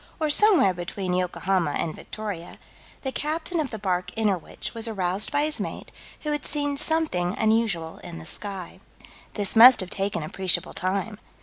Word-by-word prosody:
or 310 Hz, -2 st, +1 dB
somewhere 335 Hz, -, +5 dB
between 180 Hz, +1 st, -4 dB
Yokohama 180 Hz, -2 st, 0 dB
and 160 Hz, -, -2 dB
Victoria, 205 Hz, -6 st, -7 dB, 0.5 s
the 265 Hz, -, -2 dB
captain 320 Hz, +5 st, -2 dB
of 295 Hz, -4 st, -1 dB
the 220 Hz, -, -5 dB
bark 180 Hz, -3 st, -1 dB
Innerwich 205 Hz, -6 st, -1 dB
was 230 Hz, 0 st, -2 dB
aroused 195 Hz, -2 st, -1 dB
by 290 Hz, 0 st, +2 dB
his 305 Hz, 0 st, +2 dB
mate, -, -, -6 dB, 0.3 s
who 300 Hz, -, -2 dB
had 295 Hz, -2 st, -2 dB
seen 290 Hz, -1 st, +1 dB
something 280 Hz, -, 0 dB
unusual 220 Hz, -7 st, 0 dB
in 170 Hz, -, -9 dB
the 160 Hz, -, -9 dB
sky. 195 Hz, -1 st, -4 dB, 0.6 s
This 205 Hz, -1 st, 0 dB
must 245 Hz, +3 st, +9 dB
have 185 Hz, -1 st, -4 dB
taken 195 Hz, -2 st, -1 dB
appreciable 185 Hz, +3 st, -1 dB
time. 200 Hz, +3 st, -2 dB
205 Hz, 165 wpm, -25 LUFS, 180-275 Hz, 0.6 s, must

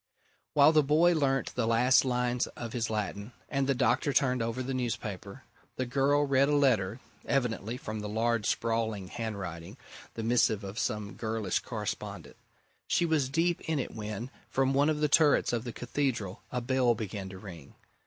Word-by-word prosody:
While 145 Hz, +1 st, +7 dB
the 155 Hz, -1 st, +5 dB
boy 155 Hz, +5 st, +4 dB
learnt 135 Hz, -4 st, 0 dB
the 125 Hz, -3 st, 0 dB
last 120 Hz, +3 st, +4 dB
lines 125 Hz, -1 st, 0 dB
of 115 Hz, -2 st, -7 dB
his 115 Hz, -2 st, -1 dB
Latin, 105 Hz, +1 st, -3 dB, 0.2 s
and 135 Hz, -1 st, 0 dB
the 140 Hz, -, +2 dB
doctor 125 Hz, +4 st, +2 dB
turned 125 Hz, -3 st, +2 dB
over 115 Hz, +3 st, -2 dB
the 135 Hz, +1 st, -3 dB
newspaper, 105 Hz, -6 st, -4 dB, 0.3 s
the 130 Hz, -, -2 dB
girl 140 Hz, +3 st, +2 dB
read 140 Hz, 0 st, +3 dB
a 150 Hz, -, +3 dB
letter 115 Hz, -7 st, +2 dB, 0.3 s
evidently, 120 Hz, -3 st, -1 dB
from 110 Hz, -4 st, -5 dB
the 105 Hz, 0 st, -5 dB
large 115 Hz, 0 st, 0 dB
sprawling 110 Hz, -4 st, -1 dB
handwriting, 95 Hz, -8 st, -6 dB, 0.4 s
the 115 Hz, -, -4 dB
missive 110 Hz, -2 st, +2 dB
of 100 Hz, +2 st, -5 dB
some 105 Hz, 0 st, -2 dB
girlish 110 Hz, -4 st, -1 dB
correspondent. -, -, -6 dB, 0.5 s
She 175 Hz, -, +2 dB
was 155 Hz, -5 st, +1 dB
deep 165 Hz, +4 st, +1 dB
in 160 Hz, -, +1 dB
it 135 Hz, -, -3 dB
when, 110 Hz, +3 st, -5 dB, 0.2 s
from 135 Hz, 0 st, +1 dB
one 140 Hz, +3 st, +3 dB
of 150 Hz, -1 st, -1 dB
the 150 Hz, -, +4 dB
turrets 150 Hz, -4 st, +4 dB
of 120 Hz, 0 st, -1 dB
the 120 Hz, -, -4 dB
Cathedral, 120 Hz, -6 st, -2 dB
a 125 Hz, -, -2 dB
bell 125 Hz, -1 st, +2 dB
began 100 Hz, -3 st, -5 dB
to 95 Hz, -, -9 dB
ring. 85 Hz, -7 st, -11 dB
120 Hz, 175 wpm, -30 LUFS, 110-135 Hz, 0.5 s, While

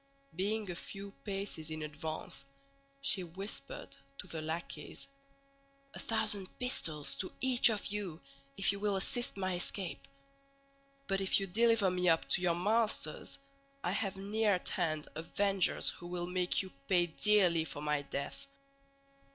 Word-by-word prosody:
Being 205 Hz, +2 st, 0 dB
a -, -, -5 dB
few 200 Hz, +3 st, -7 dB
paces 195 Hz, -6 st, -3 dB
in 155 Hz, 0 st, -4 dB
advance 150 Hz, -1 st, -5 dB, 0.6 s
she 180 Hz, +7 st, +3 dB
whispered 195 Hz, -, -7 dB, 0.2 s
to -, -, -3 dB
the 160 Hz, -, -5 dB
lackeys, 160 Hz, -1 st, -5 dB, 0.9 s
"A -, -, -7 dB
thousand 215 Hz, -4 st, +2 dB
pistoles 155 Hz, -, 0 dB
to 185 Hz, -, -3 dB
each 255 Hz, -2 st, +6 dB
of 215 Hz, -2 st, -1 dB
you, 200 Hz, -6 st, -2 dB, 0.4 s
if 195 Hz, -, +4 dB
you 200 Hz, -, -4 dB
will 205 Hz, -1 st, +1 dB
assist 220 Hz, +4 st, 0 dB
my 185 Hz, -1 st, 0 dB
escape; 180 Hz, 0 st, -3 dB, 1.0 s
but 195 Hz, -3 st, 0 dB
if 195 Hz, -, +5 dB
you 195 Hz, -, -1 dB
deliver 220 Hz, 0 st, +4 dB
me 180 Hz, 0 st, +2 dB
up 165 Hz, 0 st, +3 dB
to 180 Hz, -, +4 dB
your 175 Hz, -2 st, +2 dB
masters, 215 Hz, +5 st, 0 dB, 0.5 s
I -, -, 0 dB
have 195 Hz, -3 st, -1 dB
near 205 Hz, +2 st, +2 dB
at 180 Hz, -, -1 dB
hand 155 Hz, -4 st, -1 dB
avengers 190 Hz, +4 st, +3 dB
who 175 Hz, -, -10 dB
will 175 Hz, 0 st, -3 dB
make 180 Hz, +1 st, +1 dB
you 190 Hz, -, -10 dB, 0.2 s
pay 180 Hz, -2 st, +5 dB
dearly 175 Hz, -1 st, +4 dB
for 150 Hz, -2 st, -6 dB
my 150 Hz, -1 st, +1 dB
death." 140 Hz, -, -5 dB
190 Hz, 150 wpm, -34 LUFS, 165-205 Hz, 1.0 s, each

